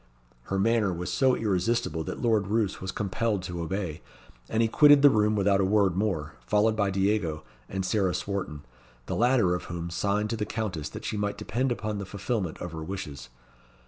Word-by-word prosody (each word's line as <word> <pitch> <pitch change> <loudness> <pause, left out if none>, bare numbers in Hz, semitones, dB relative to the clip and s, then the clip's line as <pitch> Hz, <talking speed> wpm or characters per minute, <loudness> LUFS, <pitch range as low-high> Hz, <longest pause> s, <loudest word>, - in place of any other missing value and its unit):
Her 95 - -2
manner 110 0 +2
was 90 0 -4
so 130 -2 +3
irresistible 95 -5 0
that - - -5
Lord 110 -4 +2
Roos 105 -2 0
was 95 0 -3
compelled 105 0 -1
to 90 -2 -5
obey, 85 -2 -3 0.5
and 110 +1 +2
he - - +3
quitted 145 +4 +6
the 145 - +9
room 105 0 +2
without 100 -1 +3
a - - +2
word 95 -2 +3
more, 95 -7 -1
followed 110 - +3
by 100 -2 +1
Diego 95 -5 0 0.3
and 95 -1 -2
Sarah 95 -2 +1
Swarton, 95 -7 -4 0.4
the - - -3
latter 120 -6 +3
of 90 - -3
whom 85 0 -5
signed 100 +4 0
to 115 - -1
the 105 - -1
Countess 105 -9 -3
that - - -8
she 105 - -2
might 105 0 -2
depend 120 +5 -1
upon 105 -3 -3
the 100 - -4
fulfilment 100 -3 -3
of 90 - -6
her 80 -1 -6
wishes. 75 -8 -6
100 Hz, 195 wpm, -27 LUFS, 90-110 Hz, 0.5 s, the